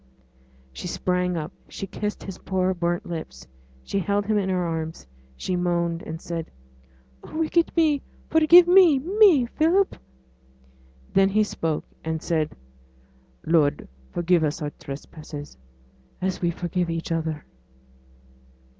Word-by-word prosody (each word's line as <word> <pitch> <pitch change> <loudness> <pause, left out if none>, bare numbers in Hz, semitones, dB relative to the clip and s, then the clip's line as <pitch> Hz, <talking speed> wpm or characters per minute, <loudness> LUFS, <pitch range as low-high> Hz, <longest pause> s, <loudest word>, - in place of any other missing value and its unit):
She - - -6
sprang 180 0 0
up, 155 0 -4 0.2
she - - -5
kissed 210 +2 -4
his 195 -2 -7
poor 190 0 0
burnt 175 -1 -1
lips; 160 - -7 0.4
she 195 - -2
held 200 +1 0
him 215 0 +2
in 190 -1 -1
her 180 -1 +1
arms, 160 - -4 0.3
she 180 - -2
moaned, 170 -1 0
and 160 0 -6
said, 165 -1 -5 0.7
'Oh, - - -8
wicked 325 +1 +2
me! 305 -4 +3 0.3
forgive 330 +3 +7
me 355 -5 +7
me 355 - +5
Philip!' 335 +10 +2 1.2
Then 195 0 +5
he 215 +2 +3
spoke, 165 -6 -2 0.2
and 160 0 -2
said, 155 -1 -1 0.9
'Lord, 155 -3 +2 0.2
forgive 175 -1 +2
us 150 0 -1
our 150 -2 -3
trespasses 145 +1 -9 0.6
as 185 0 -2
we 175 - +2
forgive 175 +1 -2
each 165 0 -3
other!' 160 -2 -2
180 Hz, 130 wpm, -24 LUFS, 165-215 Hz, 1.2 s, forgive